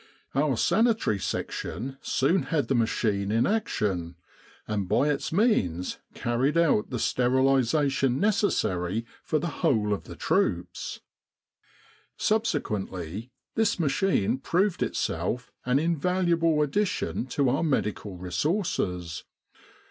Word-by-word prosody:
Our 140 -2 +1
Sanitary 220 - +2
Section 135 +6 -4
soon 160 +8 +2
had 155 -4 0
the - - +3
machine 105 -4 +1
in 115 +3 +3
action, 100 - -1 0.5
and 100 -4 -2
by 145 - +3
its 145 - -1
means 105 - +1 0.2
carried 130 +6 0
out 160 -11 +3
the 125 - -3
sterilisation 135 +2 +2
neces 205 0 +2
sary 90 +5 -1 0.2
for 155 - 0
the 160 +1 -4
whole 105 -5 +2
of 100 - -4
the - - -9
troops. - - -1 1.2
Subsequently, 110 - -1 0.2
this 220 -4 +1
machine 145 - +1
proved 185 +6 +1
itself 125 +1 -2 0.2
an 125 +2 +3
in 165 +3 +1
valuable 170 -2 +2
addition 180 - -1
to 135 0 +1
our 135 - +1
medical 105 - -1
resources. 90 - -2
135 Hz, 115 wpm, -27 LUFS, 105-170 Hz, 1.2 s, the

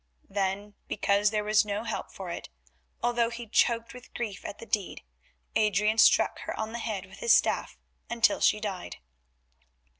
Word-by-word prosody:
Then, 200 +1 -2
because 200 +1 +2
there 210 0 -1
was 215 0 +4
no 210 +1 -3
help 225 -1 -4
for 185 -3 -7
it, - - -6 0.5
although 240 -1 +2
he 235 0 -7
choked 230 +1 +1
with 250 0 -14
grief 210 -5 -4
at - - -6
the - - -10
deed, 210 -5 -2 0.5
Adrian 210 +1 +2
struck - - +5
her - - -5
on 220 0 -2
the 235 - -5
head 210 -5 -3
with 190 +1 -15
his 235 - +6
staff - - 0 0.3
until 235 -1 +2
she 210 - +4
died. 200 -4 -5
215 Hz, 170 wpm, -28 LUFS, 200-230 Hz, 0.5 s, his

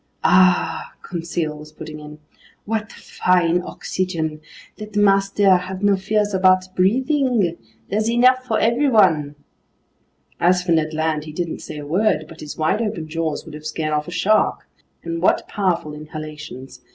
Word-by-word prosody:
"Ahhh!" 185 0 +3
Conseil 165 -2 -3
was 150 0 -12
putting 155 0 -9
in. 150 0 -10 0.5
"What 220 0 -2
fine 180 -1 +1
oxygen! 165 -4 -3 0.4
Let 215 -1 -9
master 195 -1 +4
have 185 +2 -6
no 205 -1 +4
fears 205 +2 0
about 185 0 +3
breathing. 240 - +2 0.3
There's 215 +3 0
enough 255 +2 +4
for 220 - +1
everyone." 215 - +3 1.0
As 180 +1 +3
for 180 - -1
Ned 155 -1 +1
Land, 155 -1 -1
he 155 - -8
didn't 170 +1 -4
say - - -8
a 145 - -7
word, 170 0 +1
but 165 0 -13
his 150 - -8
wide 160 +8 +1
open 175 -8 -3
jaws 160 -1 -3
would - - -11
have 150 0 -7
scared 155 0 -2
off 150 0 -1
a - - -6
shark. 200 +4 +1 0.4
And 165 0 -4
what 185 - +2
powerful 175 -6 -1
inhalations! 150 -4 -9
180 Hz, 150 wpm, -21 LUFS, 155-205 Hz, 1.0 s, master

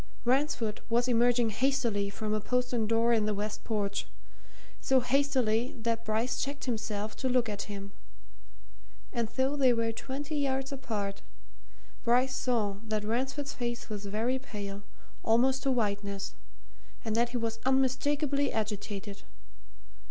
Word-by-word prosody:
Ransford 245 -4 +1
was 240 +2 +3
emerging 240 -1 +4
hastily 235 -5 +1
from 215 +1 -3
a 215 - 0
postern 245 -1 0
door 230 +1 +3
in 215 -2 +2
the 210 - +1
west 210 +1 -3
porch 200 -3 -1 0.7
so 265 -1 +4
hastily 255 -3 +2
that 230 0 0
Bryce 220 +3 0
checked 280 +1 -3
himself 220 -3 -2
to 260 - 0
look 250 -2 +3
at 205 -1 -4
him. 200 -1 -6 1.2
And 235 -3 0
though 265 +5 0
they 265 -3 +5
were 230 -1 +1
twenty 280 +6 -4
yards 270 -1 0
apart, 210 -7 -3 0.8
Bryce 250 +2 +3
saw 215 -6 0
that 215 -1 0
Ransford's 265 +6 -1
face 240 -1 -3
was 205 -1 -5
very 230 +6 0
pale, 205 -6 -6 0.4
almost 255 +4 +3
to 275 - +2
whiteness, 200 -4 -1 0.7
and 220 -1 0
that 235 +1 +3
he 245 - -2
was 225 -1 -2
unmistakably 275 +2 +2
agitated. 205 -1 -3
235 Hz, 135 wpm, -31 LUFS, 215-260 Hz, 1.2 s, they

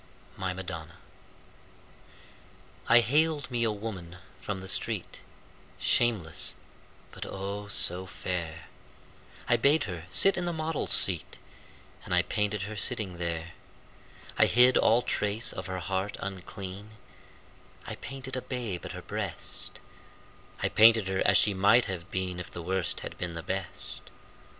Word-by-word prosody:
My 95 -1 -3
Madonna 85 -3 -7 1.9
I 120 +1 +8
haled 150 +4 +1
me 120 -1 0
a 115 - +2
woman 100 -5 -7 0.2
from 95 0 -4
the 95 - -8
street, - - 0 0.6
Shameless, 110 -10 +1 0.6
but, - - -8
oh, 100 +1 -5
so 95 -2 +4
fair! 85 -2 -5 0.8
I 120 - +4
bade 145 +6 +3
her 85 -4 -6
sit 195 0 +5
in 175 - -1
the 175 - -1
model's 160 -1 -2
seat 90 -6 +5 0.7
And 90 - -1
I 90 - +4
painted 105 0 -1
her 105 +2 -6
sitting 105 -5 -2
there. 85 -1 -3 0.9
I - - +7
hid 125 +2 +6
all 120 +2 +4
trace 105 +3 -1
of 95 -1 -6
her 95 0 -4
heart 95 +3 -3
unclean; 100 +2 -7 0.9
I - - -5
painted 130 0 -7
a 130 - -3
babe 120 -10 -4
at - - -7
her - - -8
breast; - - -5 0.9
I - - +2
painted 110 -3 +6
her 95 0 -1
as - - +6
she 105 - +5
might 105 +6 +4
have 95 -3 -6
been 95 -1 -3
If 90 - -6
the 85 - -7
Worst 95 0 -1
had - - -8
been 90 -2 -3
the 85 - -5
Best. 95 -2 -4
95 Hz, 145 wpm, -28 LUFS, 90-115 Hz, 1.9 s, I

